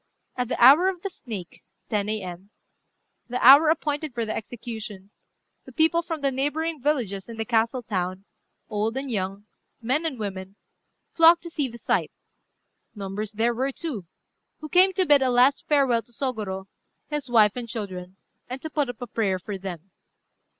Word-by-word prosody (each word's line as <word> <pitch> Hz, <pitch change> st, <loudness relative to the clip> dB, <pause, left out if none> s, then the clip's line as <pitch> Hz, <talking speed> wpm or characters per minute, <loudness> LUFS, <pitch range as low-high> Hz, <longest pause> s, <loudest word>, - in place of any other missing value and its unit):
At 250 Hz, -1 st, -1 dB
the -, -, -3 dB
hour 280 Hz, +9 st, +8 dB
of 365 Hz, -2 st, -2 dB
the 395 Hz, -, -3 dB
snake 205 Hz, -, -9 dB, 0.3 s
(10 210 Hz, -1 st, 0 dB
A.M.), 190 Hz, -3 st, -5 dB, 0.8 s
the 250 Hz, +1 st, -2 dB
hour 285 Hz, +5 st, +9 dB
appointed 300 Hz, -3 st, -1 dB
for 230 Hz, -1 st, -1 dB
the 215 Hz, -, -3 dB
execution, 220 Hz, -3 st, -7 dB, 0.5 s
the -, -, -12 dB
people 325 Hz, +1 st, +3 dB
from 325 Hz, -2 st, -5 dB
the 275 Hz, -1 st, +1 dB
neighbouring 295 Hz, +3 st, -2 dB
villages 235 Hz, -9 st, -1 dB
and 225 Hz, -1 st, -8 dB
the 225 Hz, -, -1 dB
castle 230 Hz, +2 st, +1 dB
town, 185 Hz, -2 st, -3 dB, 0.4 s
old 220 Hz, +3 st, -2 dB
and 270 Hz, -1 st, -4 dB
young, 195 Hz, -1 st, -3 dB, 0.3 s
men 265 Hz, +8 st, 0 dB
and 275 Hz, -5 st, -5 dB
women, 195 Hz, -2 st, -6 dB, 0.6 s
flocked 330 Hz, 0 st, +6 dB
to 340 Hz, -, -8 dB
see 295 Hz, -5 st, -1 dB
the 235 Hz, -1 st, -10 dB
sight: -, -, 0 dB, 0.9 s
numbers 205 Hz, +1 st, -5 dB
there 230 Hz, +3 st, +1 dB
were, 260 Hz, +4 st, -1 dB
too, 255 Hz, -, -6 dB, 0.5 s
who 310 Hz, -, -8 dB
came 370 Hz, +3 st, +5 dB
to 375 Hz, 0 st, +2 dB
bid 290 Hz, -4 st, +5 dB
a 260 Hz, -, +2 dB
last 250 Hz, +3 st, +3 dB
farewell 270 Hz, -6 st, +3 dB
to 240 Hz, -, -17 dB
Sôgorô, 215 Hz, -7 st, -3 dB, 0.5 s
his 295 Hz, -3 st, -3 dB
wife 215 Hz, -4 st, +5 dB
and 240 Hz, -2 st, -5 dB
children, 185 Hz, -5 st, -6 dB, 0.3 s
and 255 Hz, +2 st, -4 dB
to 315 Hz, -, -5 dB
put 290 Hz, -3 st, 0 dB
up 245 Hz, 0 st, -6 dB
a -, -, -3 dB
prayer 210 Hz, -5 st, -1 dB
for 200 Hz, +3 st, -6 dB
them. 190 Hz, -1 st, -8 dB
240 Hz, 175 wpm, -25 LUFS, 205-290 Hz, 0.9 s, hour